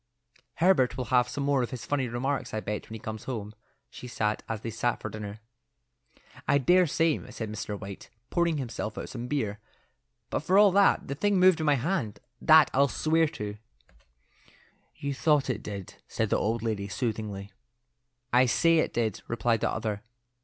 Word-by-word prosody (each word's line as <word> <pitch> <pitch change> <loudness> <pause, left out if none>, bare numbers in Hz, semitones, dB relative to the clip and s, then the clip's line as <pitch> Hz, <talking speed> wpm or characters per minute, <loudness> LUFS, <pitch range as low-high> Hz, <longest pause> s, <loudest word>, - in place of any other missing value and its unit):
"Herbert 155 -9 +3
will 130 - -2
have 125 -1 +4
some 140 - -3
more 140 -1 +2
of 120 - -2
his 125 -3 -7
funny 140 -3 0
remarks, 125 +2 -2
I - - -1
expect, 105 -1 -4
when 110 - -7
he - - -7
comes 110 0 -7
home," 110 -5 -5 0.4
she 125 - -9
said, 105 -3 -1
as 110 -2 -3
they 115 - -4
sat 120 +2 -1
at - - -3
dinner. 105 0 -7 1.1
"I 140 - +4
dare 180 +6 +4
say," 160 +1 +2
said 110 -3 -5
Mr. 105 -1 -5
White, 100 0 -9 0.2
pouring 170 -2 +1
himself 115 -5 -4
out - - -5
some 120 -1 -6
beer; 110 -8 -2 0.7
"but - - 0
for 185 +6 +2
all 205 -1 +7
that, 200 +1 +4
the 140 - -2
thing 195 +6 +1
moved 185 -2 +6
in 155 - -1
my 145 - +5
hand; 135 - -2 0.2
that 155 -3 +7
I'll 140 +1 +4
swear 160 +4 +2
to." 105 -6 -6 1.4
"You 140 0 -3
thought 145 -1 +2
it 110 -3 -4
did," 100 -3 -7
said 110 -2 -2
the - - +4
old 115 +1 -1
lady 105 -3 -2
soothingly. 105 -3 -4 0.8
"I 125 +1 +5
say 165 +6 +4
it - - -1
did," 115 -4 -1
replied 115 0 0
the - - +1
other. 110 -2 -3
120 Hz, 185 wpm, -28 LUFS, 110-150 Hz, 1.4 s, all